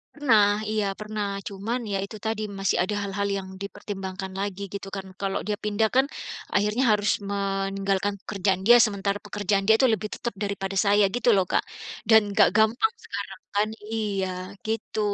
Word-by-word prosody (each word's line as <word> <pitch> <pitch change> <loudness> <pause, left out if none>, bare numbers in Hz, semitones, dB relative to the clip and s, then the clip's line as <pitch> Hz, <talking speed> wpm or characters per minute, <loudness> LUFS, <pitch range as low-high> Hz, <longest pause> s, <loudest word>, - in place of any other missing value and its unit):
Pernah. 215 -7 +4
Iya 215 -2 +1
pernah. 210 -1 -3 0.2
Cuman 210 +5 -3
ya 195 - +1
itu 215 - -10
tadi 220 -1 -1 0.2
masih 195 -1 +1
ada 205 +3 -2
hal-hal 200 0 -2
yang 190 - -6
dipertimbangkan 195 -1 -6
lagi 200 -1 -3
gitu 200 0 -5
kan. 195 -1 -5
Kalau 195 -1 -1
dia 210 -1 -1
pindah 210 +1 +1
kan 265 +1 +5 0.5
akhirnya 210 +5 +2
harus 210 0 +2 0.2
meninggalkan 195 0 -1
pekerjaan 195 -2 0
dia 240 - +9
sementara 200 -1 -1
pekerjaan 205 -1 0
dia 220 - +7
itu 260 +3 +4
lebih 215 0 -2
tetap 235 - -3
daripada 195 -1 -3
saya 205 +1 +5
gitu 245 - -2
lho 190 - +4
Kak, - - +2 0.5
dan 220 -1 +8
enggak 205 0 +6
gampang 235 - +3
sekarang 200 -1 -6 0.2
kan? 210 +1 +2 0.2
Iya 205 -4 -1 0.4
gitu. 220 0 -3
205 Hz, 165 wpm, -26 LUFS, 195-215 Hz, 0.5 s, dia